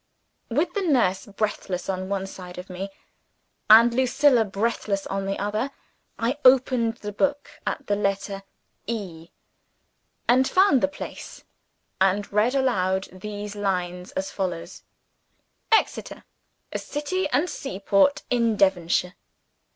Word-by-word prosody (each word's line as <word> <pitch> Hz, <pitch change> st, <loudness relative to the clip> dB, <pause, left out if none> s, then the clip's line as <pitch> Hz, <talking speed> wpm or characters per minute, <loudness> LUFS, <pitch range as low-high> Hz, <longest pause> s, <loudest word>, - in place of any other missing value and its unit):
With 310 Hz, +9 st, 0 dB
the 405 Hz, -, -1 dB
nurse 245 Hz, -, +2 dB
breathless 200 Hz, -3 st, -3 dB
on 185 Hz, 0 st, -3 dB
one 195 Hz, -1 st, -1 dB
side 180 Hz, -2 st, -10 dB
of 180 Hz, +1 st, -8 dB
me, 190 Hz, +2 st, -5 dB, 0.8 s
and 230 Hz, +2 st, +8 dB
Lucilla 260 Hz, 0 st, +4 dB
breathless 200 Hz, -1 st, -2 dB
on 195 Hz, 0 st, -3 dB
the 195 Hz, -, -1 dB
other, 215 Hz, +6 st, -1 dB, 0.5 s
I 245 Hz, +6 st, -1 dB
opened 250 Hz, -3 st, +4 dB
the 210 Hz, -2 st, -6 dB
book 285 Hz, +7 st, -1 dB, 0.2 s
at 285 Hz, -, -2 dB
the 205 Hz, -, +1 dB
letter 195 Hz, 0 st, -2 dB, 0.5 s
"E," 180 Hz, -8 st, -5 dB, 1.0 s
and 255 Hz, +2 st, +4 dB
found 370 Hz, -9 st, +4 dB
the -, -, +3 dB
place, 290 Hz, -, -9 dB, 0.6 s
and 195 Hz, +2 st, +2 dB
read 220 Hz, +6 st, +2 dB
aloud 190 Hz, -8 st, +1 dB
these 205 Hz, +2 st, -6 dB
lines, 180 Hz, -3 st, -2 dB
as 190 Hz, -, -3 dB
follows: 175 Hz, -2 st, -4 dB, 0.9 s
"EXETER: 445 Hz, -, +1 dB, 0.5 s
A -, -, -1 dB
city 295 Hz, +5 st, -2 dB
and 290 Hz, +7 st, +2 dB
seaport 195 Hz, -, +1 dB
in 235 Hz, -3 st, +2 dB
Devonshire. 180 Hz, -1 st, +2 dB
205 Hz, 125 wpm, -25 LUFS, 190-255 Hz, 1.0 s, and